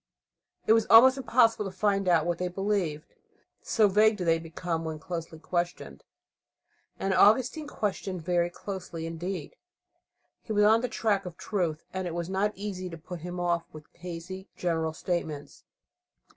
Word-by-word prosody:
It 220 Hz, -, +6 dB
was 225 Hz, -1 st, +3 dB
almost 255 Hz, +4 st, +9 dB
impossible 230 Hz, -4 st, +3 dB
to 195 Hz, -, -4 dB
find 195 Hz, -1 st, +1 dB
out 165 Hz, -3 st, +4 dB
what 175 Hz, -1 st, -1 dB
they 180 Hz, -, 0 dB
believed, 180 Hz, -5 st, -2 dB, 0.5 s
so 215 Hz, -2 st, +3 dB
vague 210 Hz, +2 st, +4 dB
did 180 Hz, -, -3 dB
they 165 Hz, 0 st, +3 dB
become 165 Hz, 0 st, -4 dB
when 160 Hz, -1 st, -4 dB
closely 165 Hz, -1 st, -6 dB
questioned. 175 Hz, +2 st, -3 dB, 1.0 s
And 195 Hz, 0 st, 0 dB
Augustine 250 Hz, +10 st, +4 dB
questioned 190 Hz, -, -3 dB
very 175 Hz, 0 st, +1 dB
closely 175 Hz, -3 st, -6 dB
indeed. 175 Hz, -, -5 dB, 0.8 s
He 220 Hz, -, -5 dB
was 210 Hz, 0 st, +4 dB
on 220 Hz, +2 st, +5 dB
the 250 Hz, -, -2 dB
track 200 Hz, -4 st, 0 dB
of 175 Hz, -1 st, -9 dB
truth, 170 Hz, -7 st, -2 dB
and 185 Hz, -1 st, -3 dB
it 170 Hz, -, -4 dB
was 170 Hz, +1 st, -3 dB
not 200 Hz, +2 st, +1 dB
easy 190 Hz, -2 st, -5 dB
to 165 Hz, -, -8 dB
put 175 Hz, +2 st, -8 dB
him 180 Hz, +2 st, -6 dB
off 175 Hz, -1 st, 0 dB
with 155 Hz, -1 st, -11 dB
hazy 180 Hz, +2 st, -8 dB
general 160 Hz, -2 st, -1 dB
statements. 160 Hz, -4 st, -4 dB
180 Hz, 160 wpm, -28 LUFS, 165-205 Hz, 1.0 s, almost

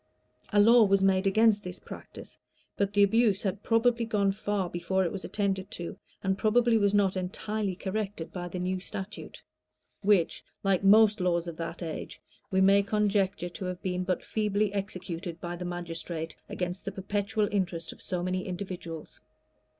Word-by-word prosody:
[] -, -, -43 dB
A 205 Hz, -, +4 dB
law 230 Hz, +3 st, +7 dB
was 195 Hz, -1 st, +3 dB
made 190 Hz, 0 st, +3 dB
against 215 Hz, +1 st, +4 dB
this 180 Hz, -2 st, -6 dB
practice; -, -, -11 dB, 0.4 s
but 200 Hz, -1 st, 0 dB
the 205 Hz, 0 st, +5 dB
abuse 210 Hz, -1 st, +3 dB
had 195 Hz, 0 st, -2 dB
probably 235 Hz, +1 st, +2 dB
gone 205 Hz, -3 st, +1 dB
far 205 Hz, -1 st, -1 dB
before 185 Hz, +2 st, 0 dB
it 170 Hz, -, -1 dB
was 195 Hz, -, -5 dB
attended 195 Hz, -2 st, -1 dB
to, 170 Hz, -1 st, -6 dB, 0.3 s
and 190 Hz, 0 st, 0 dB
probably 235 Hz, +1 st, +4 dB
was 205 Hz, -2 st, +3 dB
not 200 Hz, -2 st, +3 dB
entirely 195 Hz, +2 st, -2 dB
corrected 195 Hz, -2 st, -4 dB
by 175 Hz, -1 st, -4 dB
the 175 Hz, -, -6 dB
new 185 Hz, +1 st, -1 dB
statute, 195 Hz, +2 st, -8 dB, 0.6 s
which, 195 Hz, -5 st, +2 dB, 0.2 s
like 195 Hz, -1 st, +2 dB
most 215 Hz, +1 st, +6 dB
laws 175 Hz, -1 st, +1 dB
of 165 Hz, -2 st, -6 dB
that 165 Hz, +1 st, -5 dB
age, 160 Hz, -2 st, -6 dB, 0.3 s
we 190 Hz, 0 st, +2 dB
may 195 Hz, +1 st, +6 dB
conjecture 200 Hz, -3 st, +1 dB
to 180 Hz, +2 st, -7 dB
have 180 Hz, 0 st, -5 dB
been 180 Hz, -1 st, -1 dB
but 180 Hz, 0 st, -1 dB
feebly 210 Hz, -1 st, 0 dB
executed 185 Hz, -3 st, -4 dB
by 175 Hz, +1 st, -4 dB
the 180 Hz, +1 st, -6 dB
magistrate 170 Hz, -2 st, -5 dB
against 180 Hz, +1 st, -3 dB
the 200 Hz, -, -4 dB
perpetual 205 Hz, +2 st, -1 dB
interest 175 Hz, -5 st, -2 dB
of -, -, -16 dB
so 180 Hz, -1 st, -3 dB
many 185 Hz, +1 st, -2 dB
individuals. 180 Hz, -4 st, -6 dB
195 Hz, 175 wpm, -29 LUFS, 180-205 Hz, 0.6 s, law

